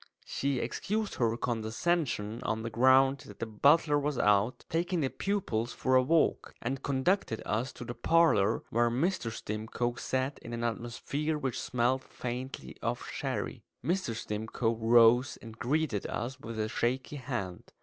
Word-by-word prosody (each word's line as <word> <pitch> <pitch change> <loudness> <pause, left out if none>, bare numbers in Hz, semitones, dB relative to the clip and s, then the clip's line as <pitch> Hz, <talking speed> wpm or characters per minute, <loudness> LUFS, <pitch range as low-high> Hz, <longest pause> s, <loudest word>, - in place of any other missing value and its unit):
She 140 -1 -1
excused 210 - -2
her 115 -1 +1
condescension 120 0 -1
on 110 0 -2
the 115 - -4
ground 130 +3 +5
that - - -11
the - - -3
butler 145 +7 +4
was 145 -1 -1
out, 105 +3 +2
taking 170 +1 0
the 135 - +1
pupils 125 - -1
for 130 0 +1
a 130 - +7
walk; 160 +5 +1
and 130 +3 -3
conducted 140 - +1
us 115 +5 -1
to 125 - -8
the 120 - -4
parlour, 120 -6 +3
where 120 0 +3
Mr. 135 +1 0
Stimcoe 110 +3 -3
sat 130 +2 -1
in 120 - -8
an 115 0 -3
atmosphere 120 +7 -2
which 135 -4 -2
smelt 125 +2 +1
faintly 125 - -6
of - - -2
sherry. - - -3 0.2
Mr. 175 -10 0
Stimcoe 110 +2 -2
rose 120 +2 +5
and 115 0 -11
greeted 140 -5 0
us 130 +3 -4
with 115 -2 -7
a 110 0 0
shaky 130 +6 -1
hand. 120 -10 -5
125 Hz, 155 wpm, -31 LUFS, 115-140 Hz, 0.2 s, a